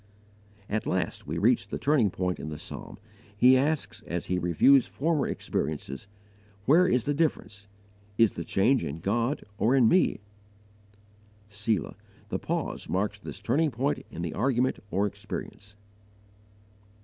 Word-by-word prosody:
At 110 +1 -2
last 95 0 -2
we - - -3
reach - - +3
the - - -4
turning 140 -8 +3
point 90 0 -2
in 75 - -5
the 75 - -6
psalm: 100 - -7 0.4
he 125 +4 +7
asks 145 +3 0
as 85 0 -3
he 90 0 -1
reviews 90 - +4
former 155 0 0
experiences, 75 +2 -3 0.6
WHERE 170 +6 +5
IS 125 -9 +2
THE 145 - 0
DIFFERENCE? 105 -10 -2 0.5
IS 115 -2 +5
THE - - -5
CHANGE 115 +5 +2
IN 75 -1 -4
GOD 115 - 0 0.2
OR 115 +7 +3
IN 125 -4 +5
ME? 180 - +3 1.3
"Selah" 105 -1 -2 0.3
the - - -2
pause - - -3
marks 100 +2 -1
this - - -8
turning 150 +7 +2
point 135 +3 -1
in 85 - -6
the 85 - -3
argument 125 +3 +1
or 100 +2 +1
experience. 105 0 -7
110 Hz, 145 wpm, -28 LUFS, 95-135 Hz, 1.3 s, he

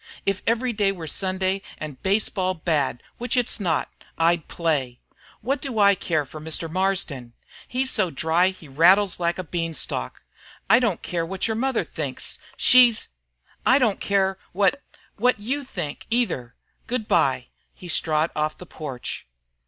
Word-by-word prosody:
If 195 -1 0
every 235 +2 +1
day 205 -2 +2
were 175 -4 -7
Sunday 190 +3 0 0.2
and 150 -4 -7
baseball 190 -2 +1
bad 150 -7 0 0.2
which 245 +2 0
it's 245 -1 +1
not 170 -6 0 0.3
I'd 165 0 +2
play. 145 -8 -1 0.4
What 270 +6 -1
do 265 -5 -4
I 200 -1 +6
care 160 -6 -1
for 155 +3 -10
Mr. 160 +1 -1
Marsden? 165 -9 -1 0.3
He's 260 +1 -1
so 190 -5 +1
dry 165 +4 +2
he 185 -4 -6
rattles 180 +8 +4
like 170 0 0
a 185 - -3
beanstalk. 165 - -3 0.4
I 225 +5 +7
don't 230 -8 0
care 170 -2 -2
what 190 +5 -2
your 220 - 0
mother 255 +2 0
thinks. - - -5 0.2
She's 245 -3 +6 0.5
I 260 - +5
don't 235 -7 +2
care 195 -1 +1
what 205 +9 +2 0.4
what 245 +1 +2
you 265 +7 -2
think, 150 - -6
either. 180 - 0 0.3
Good 235 -3 -2
bye!" 130 -2 +2 0.2
He 180 - -12
strode 160 -1 +1
off 155 0 -1
the 180 - -10
porch. 140 - -6
185 Hz, 155 wpm, -24 LUFS, 160-220 Hz, 0.5 s, I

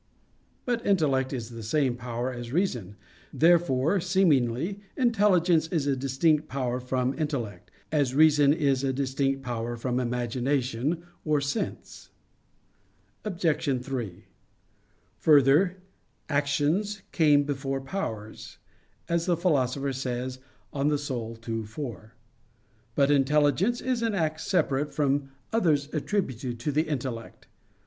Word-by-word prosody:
But 240 -2 -1
intellect 145 - +2
is 120 -4 -5
the 115 -1 -8
same 130 +3 +1
power 120 +1 -4
as 120 -1 -7
reason. 125 - -1 0.4
Therefore, 165 0 +3
seemingly, 170 - +1 0.2
intelligence 190 - +3
is 160 -4 -1
a 140 -1 +1
distinct 145 +4 +1
power 125 -2 -2
from 125 +1 -1
intellect, 120 - -3 0.2
as 140 -4 +1
reason 150 -2 +6
is 140 -4 +1
a 135 - +1
distinct 135 0 -1
power 120 -1 -3
from 125 +1 -1
imagination 125 +4 -1 0.2
or 150 -2 +2
sense. 140 +10 -4 1.1
Obj. 160 -9 0
3: 120 -9 -5 0.9
Further, 155 +5 +5 0.5
"actions 150 +8 0
came 150 -4 +4
before 135 -1 -2
powers," 115 - -6 0.5
as 170 0 0
the 175 -2 +2
Philosopher 140 -5 +1
says 130 0 -3 0.4
(De 140 - -5
Anima 140 -6 -1
ii, 115 -1 -2
4). 110 - -7 0.8
But 140 0 +3
intelligence 150 - +3
is 255 -2 -1
an 225 -3 0
act 155 -3 -1
separate 145 -5 0
from 140 -1 +1 0.2
others 150 -9 +1
attributed 135 - -2
to 150 - -1
the 155 +3 +1
intellect. 130 -6 -5
140 Hz, 115 wpm, -27 LUFS, 125-160 Hz, 1.1 s, reason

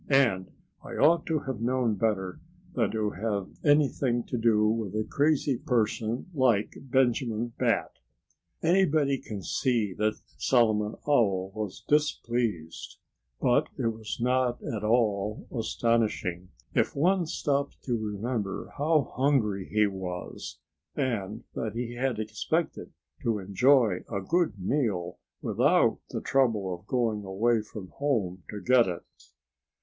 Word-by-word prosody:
And 120 -10 +3 0.3
I - - -9
ought 165 +4 +4
to 160 -2 0
have 130 -5 -5
known 125 -1 +1
better 95 -3 -1 0.3
than - - +1
to 105 -1 -1
have 100 -2 -2
anything 140 -4 +3
to - - -5
do 110 -2 +3
with 110 -3 -1
a 110 - +1
crazy 145 -3 +1
person 115 0 0
like 125 -8 +2
Benjamin 120 -3 +1
Bat." - - 0 0.6
Anybody 160 -6 +3
can 100 -3 -7
see 115 - 0
that 105 0 +1 0.2
Solomon 110 -4 +2
Owl 100 -9 +2
was 105 -3 -5
displeased. 120 - -1 0.4
But - - +3
it 115 - +1
was 110 -1 -6
not 125 0 +1
at 110 -3 -4
all 105 -2 +1
astonishing, 110 -6 0 0.2
if - - +1
one 175 +4 +2
stops 140 -2 -1
to 125 - 0
remember 110 -1 -3
how 150 -1 +2
hungry 120 -8 +1
he 105 0 +4
was, 90 -7 -5 0.4
and 110 -7 -2
that 110 -1 -3
he 120 0 -3
had 125 -1 -1
expected 110 +10 -2 0.3
to 115 -2 0
enjoy 105 +1 +3
a 100 - -1
good 160 - 0
meal 95 -5 -1 0.2
without - - +3
the - - -4
trouble 115 -8 +1
of 90 +3 -10
going 115 -4 0
away 110 +4 +1
from 105 -3 -9
home 105 -11 -1
to 105 - -5
get 125 0 +4
it. 90 -2 -4
115 Hz, 130 wpm, -28 LUFS, 105-130 Hz, 0.6 s, ought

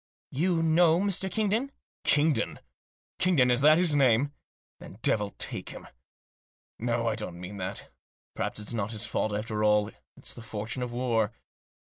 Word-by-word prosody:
" - - -74
You 170 -3 +2
know 165 +1 +4
Mr. 195 -1 0
Kingdon? 220 +6 0
" - - -76
" - - -78
Kingdon? 150 0 +1 0.6
Kingdon? 165 -9 +4
Is 125 +1 +2
that 155 +2 +7
his 175 -3 +4
name? 135 0 +3 0.5
Then 95 - -11
devil 105 -2 +2
take - - -3
him! - - -10 0.9
No, 115 0 0
I 115 - +2
don't 105 -5 -5
mean 90 +3 -7
that. 95 +1 -4 0.4
Perhaps - - -3
it's 105 +3 -2
not 110 -1 -2
his 110 - -1
fault 110 - -1
after 105 +1 -2
all; 105 -1 +3 0.3
it's - - -8
the - - -10
fortune 115 +3 -4
of 125 -1 -3
war. 120 -3 0
120 Hz, 175 wpm, -28 LUFS, 105-160 Hz, 0.9 s, that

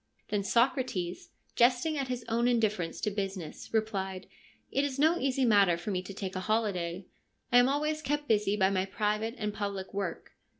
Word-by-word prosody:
Then 205 -1 0
Socrates, 235 -6 0 0.3
jesting 250 +6 +3
at 275 -2 -2
his 250 -2 -4
own 235 +1 +1
indifference 215 -8 0
to 210 - 0
business, 195 -4 -5
replied: 195 -4 -1 0.2
' - - -34
It 275 - +1
is 285 -2 -2
no 320 +4 +3
easy 265 -1 +1
matter 200 -6 +5
for 175 +5 -4
me 185 -2 -1
to 185 - -9
take 195 -1 -5
a - - -1
holiday. 185 -4 -1 0.5
I 245 - +8
am 245 +1 +5
always 305 +2 0
kept 295 0 -2
busy 210 -2 +2
by 190 -1 +3
my 190 -1 +1
private 210 +3 -1
and 210 -2 -2
public 200 -2 -4
work. 195 -4 -4
210 Hz, 185 wpm, -30 LUFS, 190-250 Hz, 0.5 s, I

